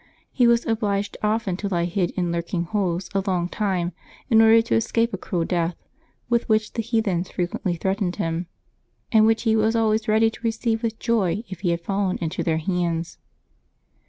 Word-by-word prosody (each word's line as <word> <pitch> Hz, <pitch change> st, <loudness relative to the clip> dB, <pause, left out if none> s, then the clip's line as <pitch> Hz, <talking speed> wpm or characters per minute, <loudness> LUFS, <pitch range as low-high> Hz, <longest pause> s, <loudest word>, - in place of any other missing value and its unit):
He 245 Hz, -2 st, +3 dB
was 235 Hz, 0 st, +3 dB
obliged 205 Hz, -3 st, -1 dB
often 210 Hz, -4 st, 0 dB
to 200 Hz, -, -3 dB
lie 175 Hz, -3 st, 0 dB
hid 175 Hz, 0 st, 0 dB
in 175 Hz, -2 st, 0 dB
lurking 170 Hz, +1 st, -2 dB
holes 180 Hz, -1 st, -1 dB
a 195 Hz, -, +1 dB
long 180 Hz, -2 st, +1 dB
time 185 Hz, -3 st, -1 dB, 0.4 s
in 225 Hz, -1 st, +7 dB
order 225 Hz, 0 st, +7 dB
to 230 Hz, -, -2 dB
escape 230 Hz, +1 st, +1 dB
a -, -, -1 dB
cruel 175 Hz, -4 st, -2 dB
death, 170 Hz, -1 st, -1 dB, 0.5 s
with 235 Hz, -1 st, 0 dB
which 215 Hz, 0 st, +1 dB
the 230 Hz, -, -1 dB
heathens 220 Hz, -6 st, 0 dB
frequently 175 Hz, 0 st, -2 dB
threatened 190 Hz, +1 st, -1 dB
him, 165 Hz, +1 st, -2 dB, 0.6 s
and 220 Hz, -2 st, +6 dB
which 225 Hz, 0 st, +2 dB
he 220 Hz, -2 st, +3 dB
was 220 Hz, +1 st, +2 dB
always 220 Hz, -1 st, +1 dB
ready 220 Hz, +1 st, +3 dB
to -, -, -13 dB
receive 225 Hz, 0 st, -1 dB
with 225 Hz, -2 st, -2 dB
joy 215 Hz, -3 st, 0 dB
if 190 Hz, -, -7 dB
he 185 Hz, -, -1 dB
had 170 Hz, 0 st, 0 dB
fallen 195 Hz, +1 st, -1 dB
into 165 Hz, 0 st, -3 dB
their 160 Hz, -1 st, +1 dB
hands. 170 Hz, 0 st, -2 dB
200 Hz, 190 wpm, -23 LUFS, 175-225 Hz, 0.6 s, in